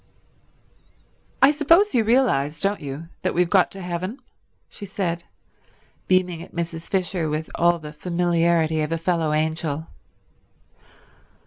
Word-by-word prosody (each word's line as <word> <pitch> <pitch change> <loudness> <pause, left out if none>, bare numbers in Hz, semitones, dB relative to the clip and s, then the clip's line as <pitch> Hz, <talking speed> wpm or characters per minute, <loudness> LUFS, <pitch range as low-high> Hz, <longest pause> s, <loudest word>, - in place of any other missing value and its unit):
"I 275 - +8
suppose 330 +7 +4
you 235 -3 +3
realize, 210 - +2
don't 200 +1 +1
you, 145 +4 -7
that - - -1
we've 175 0 +2
got 190 -3 +4
to 195 - -8
heaven?" 180 +6 -4 0.5
she - - -12
said, 180 -4 -3 0.8
beaming 180 -2 +1
at 175 - -12
Mrs. 170 -1 -4
Fisher 180 -4 -1
with 155 +1 -3
all 175 0 +3
the 150 -2 -9
familiarity 170 -1 +1
of 150 +1 -2
a 165 - 0
fellow 165 -2 0
angel. 155 0 -1
170 Hz, 130 wpm, -23 LUFS, 160-190 Hz, 0.8 s, I